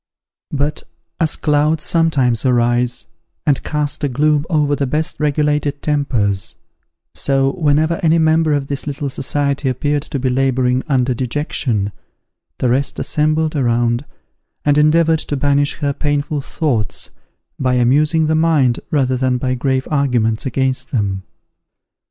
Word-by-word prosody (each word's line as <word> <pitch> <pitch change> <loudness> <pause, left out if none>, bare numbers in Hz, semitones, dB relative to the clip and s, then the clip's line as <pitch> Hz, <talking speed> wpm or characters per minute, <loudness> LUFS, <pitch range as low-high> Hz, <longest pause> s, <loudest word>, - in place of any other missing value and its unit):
But, 145 +1 -2 0.4
as 160 -3 +1
clouds 150 +1 +1
sometimes 140 -9 +1
arise, 120 -1 +1 0.4
and 140 -2 +2
cast 150 -1 -3
a 145 - +1
gloom 150 +3 +1
over 150 -4 +2
the 140 -1 -1
best 155 +4 -2
regulated 150 -1 0
tempers, 110 - -1 0.6
so 135 -1 +1
whenever 155 +1 +1
any 165 0 +3
member 160 -1 +3
of 140 -1 -1
this 140 +1 -5
little 145 0 -3
society 140 +1 -1
appeared 145 +3 0
to 145 - -5
be 130 0 -1
labouring 130 -1 +1
under 130 -3 +1
dejection, 120 -4 -2 0.7
the 125 - 0
rest 135 +3 0
assembled 155 +1 0
around, 120 -2 +1 0.6
and 145 0 +4
endeavoured 160 +1 +4
to 145 - -3
banish 145 +1 +1
her 140 -1 0
painful 145 0 -1
thoughts 130 -8 -2 0.5
by 130 -1 +1
amusing 150 +6 +3
the 155 - +1
mind 155 -7 +2
rather 130 -4 +1
than 130 0 +1
by 130 +1 -1
grave 130 +1 -1
arguments 125 -5 +1
against 130 +1 -1
them. 100 -8 -1
140 Hz, 135 wpm, -18 LUFS, 125-150 Hz, 0.7 s, and